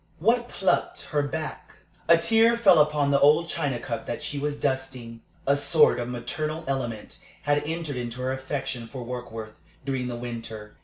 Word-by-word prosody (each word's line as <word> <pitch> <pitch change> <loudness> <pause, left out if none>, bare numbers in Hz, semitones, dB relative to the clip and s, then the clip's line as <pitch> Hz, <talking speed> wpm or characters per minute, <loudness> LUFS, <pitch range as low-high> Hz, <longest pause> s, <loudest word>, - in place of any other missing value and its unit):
What 235 +6 +2
plucked 190 - 0
her 150 -2 +1
back? 155 +2 -5 0.3
A 170 - +7
tear 225 +6 +4
fell 195 -8 +6
upon 150 -1 +2
the 140 - +4
old 150 +4 +5
china 140 -5 -1
cup 120 -1 -5
that - - -4
she 145 -1 -3
was 145 0 -2
dusting. 130 -4 -3 0.2
A 140 - +4
sort 145 +1 +4
of 120 0 -3
maternal 150 +7 -4
element 120 -6 -3 0.2
had 145 0 +2
entered 160 -4 -3
into 120 0 -5
her 130 - 0
affection 130 -3 -4
for 130 0 -7
Warkworth 115 -3 -6 0.3
during 130 -2 -1
the 120 - -4
winter. 115 -3 -7
140 Hz, 170 wpm, -26 LUFS, 120-155 Hz, 0.3 s, A